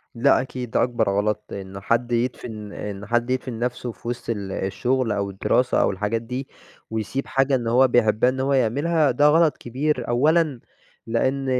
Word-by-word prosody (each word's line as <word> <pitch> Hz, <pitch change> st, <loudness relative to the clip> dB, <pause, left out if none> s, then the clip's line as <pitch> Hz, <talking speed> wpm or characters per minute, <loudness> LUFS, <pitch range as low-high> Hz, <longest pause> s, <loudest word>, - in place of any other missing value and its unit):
لأ 130 Hz, +2 st, +4 dB
أكيد، 125 Hz, -2 st, -6 dB
ده -, -, +2 dB
أكبر 120 Hz, -4 st, 0 dB
غلط 105 Hz, +1 st, 0 dB
إن 95 Hz, 0 st, -7 dB
حد 120 Hz, +4 st, 0 dB
يدفن 115 Hz, -3 st, -3 dB
إن 105 Hz, 0 st, -6 dB
حد 120 Hz, +2 st, 0 dB
يدفن 130 Hz, -2 st, -2 dB
نفسه 125 Hz, 0 st, -2 dB
في 115 Hz, -, -13 dB
وسط 120 Hz, 0 st, -4 dB
ال 100 Hz, -4 st, -3 dB
الشغل 120 Hz, +6 st, -1 dB
أو 100 Hz, -1 st, -1 dB
الدراسة 120 Hz, +6 st, +1 dB
أو -, -, +2 dB
الحاجات 105 Hz, +4 st, -2 dB
دي، 125 Hz, +3 st, -5 dB, 0.4 s
ويسيب 110 Hz, +5 st, -3 dB
حاجة 135 Hz, 0 st, +2 dB
اللي 120 Hz, -2 st, -1 dB
هو 130 Hz, +3 st, +5 dB
بيحبها 115 Hz, 0 st, +3 dB
إن 130 Hz, -, -3 dB
هو 135 Hz, +1 st, +1 dB
يعملها 145 Hz, +4 st, +2 dB
ده 145 Hz, +4 st, +4 dB
غلط 160 Hz, +1 st, +4 dB
كبير، 130 Hz, +1 st, -2 dB
أولًا 150 Hz, +3 st, +2 dB, 0.5 s
لإن 130 Hz, +4 st, 0 dB
120 Hz, 175 wpm, -23 LUFS, 110-130 Hz, 0.5 s, هو